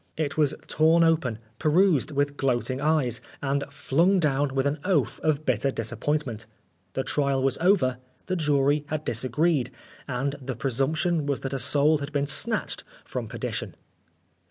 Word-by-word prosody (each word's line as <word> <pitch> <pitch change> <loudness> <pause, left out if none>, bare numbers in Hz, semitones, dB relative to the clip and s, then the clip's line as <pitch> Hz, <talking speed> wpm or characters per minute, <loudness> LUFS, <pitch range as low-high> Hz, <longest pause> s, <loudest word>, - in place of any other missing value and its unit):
It 150 -3 -1
was 150 -2 +2
torn 160 +2 +4
open, 155 -9 +2 0.2
perused 160 -1 +3
with 145 -1 0
gloating 130 -1 -1
eyes, 150 -6 +1 0.2
and 140 0 -1
flung 165 +7 +2
down 145 -3 +1
with 135 0 +1
an 145 +2 0
oath 180 -8 +1
of 155 -1 0
bitter 130 +2 +1
disappointment. 120 0 -2 0.5
The 130 - -1
trial 140 -2 0
was 135 - +1
over, 155 -9 +3 0.3
the 185 - -1
jury 145 -2 +2
had 155 0 -3
disagreed, 130 +3 +1 0.4
and 140 +2 -2
the 130 -1 -4
presumption 145 +6 0
was 140 -2 -1
that 135 0 -4
a 135 - -1
soul 150 +3 +3
had 140 0 -5
been 145 -1 0
snatched 220 +9 -1 0.2
from - - -4
perdition. - - -4
145 Hz, 155 wpm, -26 LUFS, 135-155 Hz, 0.5 s, torn